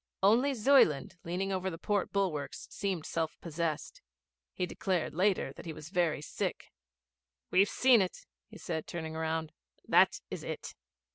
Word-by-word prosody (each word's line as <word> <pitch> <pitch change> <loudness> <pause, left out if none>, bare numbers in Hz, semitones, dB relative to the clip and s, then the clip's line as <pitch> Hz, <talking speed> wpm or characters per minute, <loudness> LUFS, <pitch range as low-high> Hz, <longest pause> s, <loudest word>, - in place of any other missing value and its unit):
Only 240 +8 +5
Zuyland, 210 - +4
leaning 185 +3 -2
over 190 0 -1
the 165 - -6
port 205 +2 -1
bulwarks, 155 -9 -2
seemed 190 -6 -2
self 165 -1 -2
possessed. 165 -1 -3 0.5
He 180 - -2
declared 180 -2 -1
later 185 -5 +1
that 170 - -11
he 160 - -4
was 155 0 -10
very 170 -5 +1
sick. - - -4 0.8
'We've 195 +2 +5
seen 255 -4 +5
it,' 185 - -3 0.2
he 215 - -12
said, 160 -5 -4
turning 160 -2 -5
round. 160 0 -2 0.4
'That - - +5
is - - -5
it.' - - -5
180 Hz, 150 wpm, -31 LUFS, 160-195 Hz, 0.8 s, Only